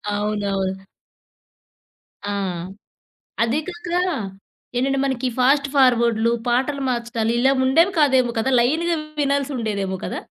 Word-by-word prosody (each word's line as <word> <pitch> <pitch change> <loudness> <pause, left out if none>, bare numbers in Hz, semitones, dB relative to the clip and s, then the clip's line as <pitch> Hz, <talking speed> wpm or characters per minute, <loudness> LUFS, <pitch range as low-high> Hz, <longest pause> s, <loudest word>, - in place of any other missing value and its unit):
అవునవును. 200 -2 -2 1.5
ఆ! - - -1 1.1
అది 235 +5 +1
కాక 345 -1 -7 0.9
ఏంటంటే 270 +2 +1
మనకి 265 -1 -1
ఫాస్ట్ 275 +2 +3
ఫార్వర్డ్‌లు 235 -3 +3 0.2
పాటలు 265 +4 0
మార్చటాలు 235 -2 -1
ఇలా 265 +3 +4
ఉండేవి 330 +9 +4
కాదేమో 260 -4 +3
కదా! 260 - 0
లైన్‌గా 325 +8 +1 0.3
వినాల్సి 280 0 0
ఉండేదేమో 200 -4 -2
కదా! - - -4
250 Hz, 105 wpm, -21 LUFS, 225-275 Hz, 1.5 s, ఇలా